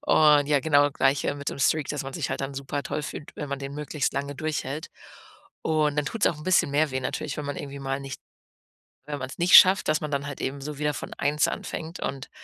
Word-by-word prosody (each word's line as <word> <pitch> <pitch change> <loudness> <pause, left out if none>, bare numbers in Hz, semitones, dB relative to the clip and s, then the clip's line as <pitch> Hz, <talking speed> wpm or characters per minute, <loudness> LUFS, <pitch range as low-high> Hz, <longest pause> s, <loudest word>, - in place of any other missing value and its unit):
Und 150 -2 +5
ja, 145 -2 +3
genau, 145 -1 +4
das 145 - 0
Gleiche 140 +1 +1
mit 140 0 -4
dem - - -5
Streak, 150 +1 +2
dass 150 -1 -2
man 135 0 -7
sich - - -3
halt - - -2
dann 135 +1 -3
super-toll 140 +2 -3
fühlt, 150 - -7
wenn 145 - -5
man 140 -1 -3
den 140 0 -6
möglichst 150 0 -2
lange 140 +1 -3
durchhält. 150 -1 -3 0.7
Und 150 -2 +1
dann 150 - +1
tut's 225 - 0
auch 160 - -3
'n 150 - -10
bisschen 185 -6 +3
mehr 150 +1 +2
weh 130 - -1
natürlich, 140 +3 -3
wenn 145 - -4
man 145 - -4
irgendwie 140 0 -6
mal 135 0 -2
nicht 135 -1 -7 0.9
wenn 145 -1 -4
man's 130 0 -6
nicht 175 +1 +8
schafft, 190 +2 +7
dass 155 +1 +2
man 150 -1 -4
dann 140 0 -2
halt 145 - -7
eben 140 +1 -3
so 145 0 -6
wieder 150 0 0
von - - -6
1 145 +1 +1
anfängt 165 +2 -5
und 135 -1 -4
145 Hz, 240 wpm, -26 LUFS, 140-150 Hz, 0.9 s, nicht